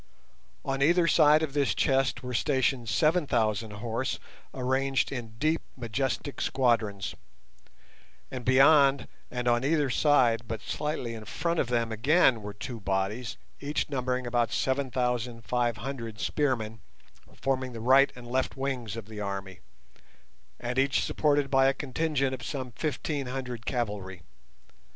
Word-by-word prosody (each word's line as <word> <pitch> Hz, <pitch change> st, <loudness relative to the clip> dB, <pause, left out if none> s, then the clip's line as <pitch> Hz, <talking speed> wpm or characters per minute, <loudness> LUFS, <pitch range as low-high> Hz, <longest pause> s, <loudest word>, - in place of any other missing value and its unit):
On 135 Hz, 0 st, -1 dB
either 170 Hz, +4 st, +4 dB
side 155 Hz, -1 st, +5 dB
of 145 Hz, -3 st, -3 dB
this 145 Hz, -2 st, +1 dB
chest 135 Hz, -3 st, +1 dB
were 125 Hz, 0 st, -5 dB
stationed 125 Hz, -1 st, +1 dB
seven 155 Hz, +5 st, +2 dB
thousand 110 Hz, -3 st, +1 dB
horse 115 Hz, +4 st, -2 dB, 0.3 s
arranged 130 Hz, +1 st, 0 dB
in 115 Hz, -5 st, -6 dB
deep, 155 Hz, +5 st, +1 dB, 0.2 s
majestic 130 Hz, +4 st, -2 dB
squadrons; 115 Hz, -6 st, +1 dB, 1.2 s
and 130 Hz, -1 st, -5 dB
beyond 135 Hz, 0 st, +5 dB, 0.2 s
and 125 Hz, 0 st, -3 dB
on 120 Hz, +1 st, +3 dB
either 145 Hz, -2 st, +2 dB
side 120 Hz, -6 st, +3 dB
but 115 Hz, -, -4 dB
slightly 150 Hz, -6 st, -3 dB
in 110 Hz, -1 st, -8 dB
front 170 Hz, -, -1 dB
of -, -, +1 dB
them 115 Hz, -2 st, 0 dB
again 125 Hz, +1 st, +3 dB
were 105 Hz, 0 st, -6 dB
two 115 Hz, +2 st, -6 dB
bodies, 100 Hz, +4 st, -2 dB, 0.2 s
each 145 Hz, +1 st, -2 dB
numbering 130 Hz, -1 st, -1 dB
about 120 Hz, -2 st, +1 dB
seven 135 Hz, 0 st, 0 dB
thousand 125 Hz, -2 st, -2 dB
five 120 Hz, -2 st, 0 dB
hundred 115 Hz, -2 st, -6 dB
spearmen, 115 Hz, -8 st, -1 dB, 0.6 s
forming 130 Hz, -1 st, -1 dB
the 115 Hz, -, -6 dB
right 135 Hz, +4 st, +5 dB
and 125 Hz, -1 st, -11 dB
left 130 Hz, +2 st, -1 dB
wings 130 Hz, -5 st, -3 dB
of 115 Hz, -, -6 dB
the 110 Hz, 0 st, -9 dB
army, 100 Hz, -2 st, -5 dB, 1.0 s
and 125 Hz, +2 st, -2 dB
each 135 Hz, 0 st, +2 dB
supported 145 Hz, -2 st, +1 dB
by 135 Hz, -1 st, +5 dB
a 135 Hz, -, +2 dB
contingent 140 Hz, -1 st, -1 dB
of 130 Hz, -, -5 dB
some 130 Hz, -4 st, -5 dB
fifteen 145 Hz, +1 st, -3 dB
hundred 125 Hz, -3 st, -5 dB
cavalry. 100 Hz, -7 st, -3 dB
125 Hz, 145 wpm, -28 LUFS, 115-135 Hz, 1.2 s, side